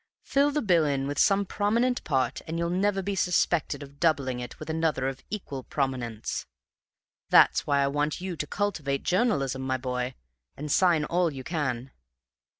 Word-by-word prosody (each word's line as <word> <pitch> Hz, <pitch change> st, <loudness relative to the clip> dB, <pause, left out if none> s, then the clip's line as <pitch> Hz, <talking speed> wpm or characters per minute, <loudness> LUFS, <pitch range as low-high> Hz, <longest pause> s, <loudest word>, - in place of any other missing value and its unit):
Fill 280 Hz, +1 st, +2 dB
the 295 Hz, -1 st, -1 dB
bill 175 Hz, -6 st, +4 dB
in 140 Hz, -1 st, -1 dB
some 200 Hz, +4 st, +3 dB
prominent 230 Hz, +6 st, +1 dB
part, 130 Hz, -4 st, 0 dB
and 165 Hz, +1 st, -3 dB
you'll 170 Hz, 0 st, -1 dB
never 195 Hz, +1 st, +1 dB
be 200 Hz, +2 st, -2 dB
suspected 175 Hz, -5 st, +1 dB
of 140 Hz, 0 st, -14 dB
doubling 140 Hz, -6 st, +1 dB
it 120 Hz, -1 st, -7 dB
with 155 Hz, -, -8 dB
another 160 Hz, -4 st, 0 dB
of 135 Hz, 0 st, -4 dB
equal 165 Hz, -10 st, -5 dB
prominence. 125 Hz, -6 st, -3 dB, 0.8 s
That's -, -, +5 dB
why 140 Hz, -1 st, +3 dB
I -, -, +2 dB
want 145 Hz, +2 st, -1 dB
you 185 Hz, -1 st, -4 dB
to 150 Hz, -, -4 dB
cultivate 155 Hz, -10 st, -1 dB
journalism, 160 Hz, -, +1 dB
my 130 Hz, 0 st, -1 dB
boy, 125 Hz, 0 st, -3 dB, 0.4 s
and 150 Hz, +1 st, -4 dB
sign 170 Hz, -2 st, +4 dB
all 175 Hz, +1 st, +1 dB
you 135 Hz, -2 st, -7 dB
can. 135 Hz, -5 st, -2 dB
150 Hz, 165 wpm, -27 LUFS, 135-185 Hz, 0.8 s, That's